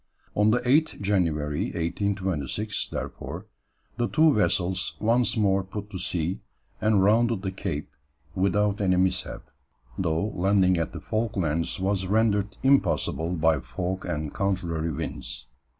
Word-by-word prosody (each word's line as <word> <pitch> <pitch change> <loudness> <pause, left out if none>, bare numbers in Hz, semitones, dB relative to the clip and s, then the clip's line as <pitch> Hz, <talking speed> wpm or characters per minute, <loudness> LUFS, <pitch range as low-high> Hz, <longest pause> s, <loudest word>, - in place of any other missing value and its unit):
On 105 +1 +3
the 115 - +4
8th 145 +6 +2
January, 80 -7 0
1826, 95 - -2
therefore, - - -6 0.5
the 120 - +1
two 155 +2 +4
vessels 95 -4 +1
once 120 +2 +2
more 100 -2 +2
put 105 +2 -7
to 95 - -5
sea, 90 -1 -2 0.4
and 105 -3 +3
rounded 110 0 +3
the 95 - -2
Cape 95 -6 -4 0.4
without 100 +2 +1
any 95 -2 +3
mishap, 90 +1 0 0.6
though 85 +3 0
landing 95 -1 +3
at 80 -1 -1
the - - -7
Falklands 95 -9 -1
was 95 0 0
rendered 105 -1 +1
impossible 110 -10 +2
by 80 -2 +3
fog 90 +7 -4
and 75 -1 -3
contrary 85 -5 -1
winds. - - -5
95 Hz, 130 wpm, -26 LUFS, 85-105 Hz, 0.6 s, the